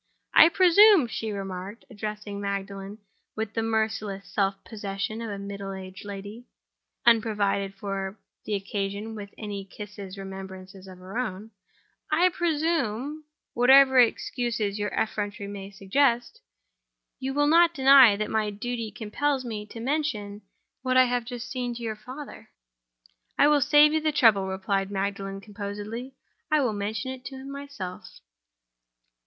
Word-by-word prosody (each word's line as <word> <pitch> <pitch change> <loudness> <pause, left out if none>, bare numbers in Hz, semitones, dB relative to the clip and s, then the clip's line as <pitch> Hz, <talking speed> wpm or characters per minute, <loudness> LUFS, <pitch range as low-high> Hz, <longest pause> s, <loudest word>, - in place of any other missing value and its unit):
"I 320 - +9
presume," 375 - +6
she 225 -1 -4
remarked, 195 +1 -6
addressing 210 -2 -5
Magdalen 200 0 -4 0.4
with 220 -1 -3
the 225 - -1
merciless 220 -3 -1
self 195 -1 0
possession 205 +1 -4
of 230 - -4
a 200 - -4
middle 200 0 -6
aged 190 +1 -9
lady, 205 +4 -8 0.6
unprovided 205 -4 +2
for 195 0 -4 0.3
the 210 - -2
occasion 200 +2 -3
with 205 -2 -8
any 205 -2 -5
kissing 200 0 -9
remembrances 190 0 -9
of 185 -1 -11
her 185 +6 -6
own—"I 225 - -2
presume 310 -5 -1 0.3
(whatever 265 +2 +6
excuses 230 -3 +1
your 205 0 -1
effrontery 205 -2 -2
may 200 -1 -7
suggest) 240 - 0 0.8
you 270 +1 -3
will 290 0 +3
not 335 +3 +5
deny 265 -5 +8
that 210 +1 -3
my 220 -1 +1
duty 230 +2 -4
compels 260 +6 -2
me 210 -3 -5
to 230 - -9
mention 225 -7 -2 0.4
what 255 -1 +1
I 255 - +8
have 245 -1 0
just 245 0 -7
seen 250 -2 -3
to 235 - -7
your 220 -1 -3
father?" 255 +7 -10 0.9
"I 285 - +6
will 295 -1 +4
save 295 +3 +6
you 315 - +1
the 310 0 +1
trouble," 220 -9 +4
replied 195 +1 -1
Magdalen, 195 0 -3
composedly. 210 +5 -6 0.3
"I 310 -1 +4
will 250 -6 +1
mention 215 +5 -3
it 260 -1 -9
to 270 - -7
him 265 +1 -8
myself." 280 -10 -7
215 Hz, 140 wpm, -26 LUFS, 200-255 Hz, 0.9 s, I